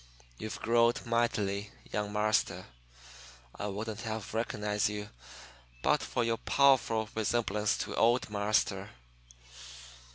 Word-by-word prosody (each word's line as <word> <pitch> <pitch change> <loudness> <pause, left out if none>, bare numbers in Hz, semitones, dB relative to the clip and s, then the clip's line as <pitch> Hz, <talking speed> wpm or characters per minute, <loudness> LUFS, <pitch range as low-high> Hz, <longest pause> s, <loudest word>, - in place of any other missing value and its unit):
You've 110 - -5
growed 115 +1 +3
mightily, 105 -4 0 0.2
young 105 0 -2
marster. 105 +1 +1 0.9
I 105 - -4
wouldn't 105 +2 -4
have 110 -3 -5
reconnized 105 -2 0
you 105 0 -5 0.7
but - - +3
for 120 - -1
yo' 115 0 0
powerful 125 -6 +3
resemblance 105 -2 0
to - - -4
old 120 +2 +3
marster." 100 -1 0
110 Hz, 105 wpm, -31 LUFS, 105-115 Hz, 0.9 s, growed